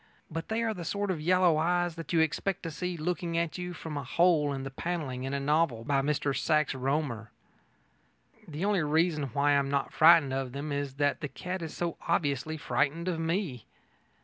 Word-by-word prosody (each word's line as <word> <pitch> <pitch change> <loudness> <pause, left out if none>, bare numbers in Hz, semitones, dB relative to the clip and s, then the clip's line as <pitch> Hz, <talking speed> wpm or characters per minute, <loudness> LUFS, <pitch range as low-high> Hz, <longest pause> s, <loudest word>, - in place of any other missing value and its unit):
But 165 +1 -4
they 225 +1 -1
are 225 -1 0
the 180 -4 -7
sort 200 +3 -1
of 165 -4 -3
yellow 180 -1 +4
eyes 175 +2 +1
that 165 0 -8
you 165 -2 +4
expect 165 +4 -1
to 165 - -4
see 180 +3 -4
looking 170 +1 -2
out 170 - +3
at 165 0 -6
you 180 0 -4
from 160 -3 -6
a 140 - -3
hole 155 +1 +3
in 135 -1 -4
the 135 - -5
panelling 135 -4 -3
in 135 - -3
a - - -1
novel 145 -5 +1
by 135 +2 +1
Mr 140 -1 0
Sax 155 -2 +1
Rohmer. 135 -4 -2 1.2
The 160 +3 -3
only 205 -3 +2
reason 155 0 +1
why 140 +3 +1
I 140 - +5
am 135 0 -1
not 140 -1 -1
frightened 160 -4 +6
of 135 -2 -3
them 145 +2 -4
is 140 -2 -3
that 145 0 0
the 150 - -2
cat 180 +7 -5
is 160 -2 -6
so 170 -1 -2
obviously 155 -2 0
frightened 150 +3 0
of 175 -3 -1
me. 165 - -2
155 Hz, 210 wpm, -29 LUFS, 140-175 Hz, 1.2 s, frightened